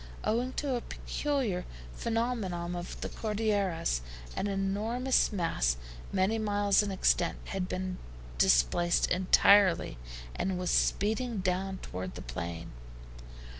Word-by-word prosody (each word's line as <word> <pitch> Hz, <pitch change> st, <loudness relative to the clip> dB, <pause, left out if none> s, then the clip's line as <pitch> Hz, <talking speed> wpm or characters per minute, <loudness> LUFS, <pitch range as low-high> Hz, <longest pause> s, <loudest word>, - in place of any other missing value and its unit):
Owing 245 Hz, +4 st, 0 dB
to 280 Hz, -3 st, -1 dB
a 240 Hz, -, -1 dB
peculiar 260 Hz, -13 st, -2 dB, 0.3 s
phenomenon 220 Hz, -7 st, -2 dB
of 175 Hz, 0 st, -6 dB
the -, -, -3 dB
Cordilleras, 200 Hz, -, 0 dB, 0.3 s
an 205 Hz, -, -1 dB
enormous 210 Hz, +6 st, +1 dB
mass, 115 Hz, -, 0 dB, 0.3 s
many 195 Hz, +4 st, +1 dB
miles 205 Hz, -2 st, +3 dB
in 205 Hz, -, -2 dB
extent, 185 Hz, -2 st, +2 dB
had 190 Hz, -2 st, -2 dB
been 185 Hz, 0 st, -3 dB, 0.4 s
displaced 60 Hz, -, +3 dB
entirely, 185 Hz, -, +5 dB, 0.4 s
and 190 Hz, -1 st, -1 dB
was 180 Hz, -1 st, -1 dB
speeding 220 Hz, +3 st, +1 dB
down 190 Hz, +1 st, -1 dB
toward 90 Hz, 0 st, -5 dB
the -, -, -7 dB
plain. 80 Hz, +7 st, -5 dB
195 Hz, 115 wpm, -30 LUFS, 175-220 Hz, 0.4 s, entirely